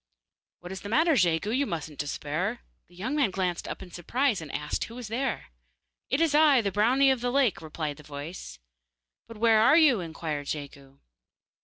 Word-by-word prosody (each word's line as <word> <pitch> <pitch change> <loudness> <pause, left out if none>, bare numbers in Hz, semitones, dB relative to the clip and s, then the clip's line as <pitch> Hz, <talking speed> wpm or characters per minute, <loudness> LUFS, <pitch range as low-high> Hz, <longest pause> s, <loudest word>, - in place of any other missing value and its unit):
'What 175 +1 -9
is 190 - -6
the 205 - -7
matter, 320 +8 +3
Jegu? 180 - +2
You 270 +3 +1
mustn't 155 -3 -5
despair 150 +7 -2
yet.' 245 - -16 0.3
The 175 - -21
young 225 +11 -3
man 285 -8 +2
glanced 185 -2 -2
up - - -6
in 180 - -13
surprise, 235 - 0
and 155 -3 -8
asked 150 +1 -2
who 230 - -11
was 245 -3 -7
there. 245 - -3 0.6
'It 270 - +1
is 325 -2 +2
I, 300 -3 +6
the 200 -2 -1
brownie 255 +7 +4
of 260 -3 -1
the 245 - 0
lake,' 255 -8 +2
replied 155 -2 -5
the - - -12
voice. 145 - -8 0.7
'But 230 - -11
where 225 0 +4
are 300 +8 +6
you?' 295 -9 +5
inquired 160 -4 -5
Jegu. 140 -2 -7
200 Hz, 195 wpm, -27 LUFS, 160-255 Hz, 0.7 s, I